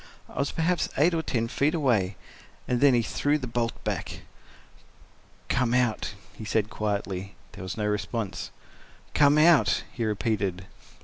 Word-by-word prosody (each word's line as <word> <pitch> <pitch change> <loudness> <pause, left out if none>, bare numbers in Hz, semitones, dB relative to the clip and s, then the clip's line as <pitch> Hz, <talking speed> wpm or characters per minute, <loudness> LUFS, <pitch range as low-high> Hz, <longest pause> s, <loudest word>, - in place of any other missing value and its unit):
I - - -8
was 140 - 0
perhaps 170 +2 0
eight 160 +5 +4
or 165 - +1
ten 115 -7 -1
feet 145 +7 +1
away—and 120 - -2
then 140 -3 +6
he 120 - +2
threw 145 +6 +1
the 135 - -5
bolt 115 -1 -2
back. - - -3 1.3
"Come 125 -1 +1
out," 120 -4 0 0.2
he - - -9
said 110 0 0
quietly. 100 -2 -3 0.2
There - - -10
was 95 - -5
no 105 - -1
response. 105 -2 -2 0.6
"Come—out," 145 -4 +5
he 120 - -3
repeated. 100 -4 -1
115 Hz, 140 wpm, -27 LUFS, 105-140 Hz, 1.3 s, then